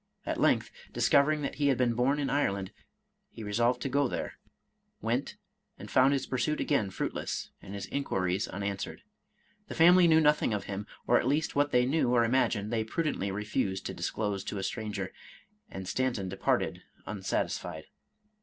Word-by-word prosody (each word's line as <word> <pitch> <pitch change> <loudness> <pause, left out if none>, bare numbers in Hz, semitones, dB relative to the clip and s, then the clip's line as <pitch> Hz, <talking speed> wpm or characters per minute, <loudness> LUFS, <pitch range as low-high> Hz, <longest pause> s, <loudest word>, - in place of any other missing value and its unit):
At - - -2
length, - - +2 0.2
discovering 150 +1 +3
that - - -2
he 145 - +4
had 135 -3 +3
been 125 -2 +2
bom 125 +5 +2
in 145 -2 -1
Ireland, 100 -9 0 0.6
he 115 - -9
resolved 120 +4 +1
to - - -1
go 140 +1 +2
there, - - -5 0.3
— - - -37
^went, - - -1 0.4
and - - -10
found 130 +2 +5
his 140 - 0
pursuit 130 +4 -1
again 125 -9 +1
fruitless, - - -3
and 100 - -8
his 100 - -4
inquiries 95 -9 -1
unanswered. 100 - -4 0.6
The - - -7
family 175 +1 +7
knew 160 -1 +6
nothing 150 -7 +3
of 100 - -3
him, 100 +1 -5 0.2
or - - +4
at - - -1
least 150 +3 0
what 145 0 +2
they 125 0 +4
knew 140 -1 +2
or 120 -1 +4
imagined, 115 -3 +1
they 110 -1 +1
prudently 110 -4 -1
refused 95 -1 -2
to - - -3
disclose 105 -3 -2
to 105 - -4
a 95 - -3
stranger, 105 -3 -3 0.6
and 95 - -7
Stan 130 +5 0
ton 95 -5 -4
departed 95 - 0 0.2
unsatisfied. 90 -5 -3
120 Hz, 175 wpm, -30 LUFS, 100-140 Hz, 0.6 s, family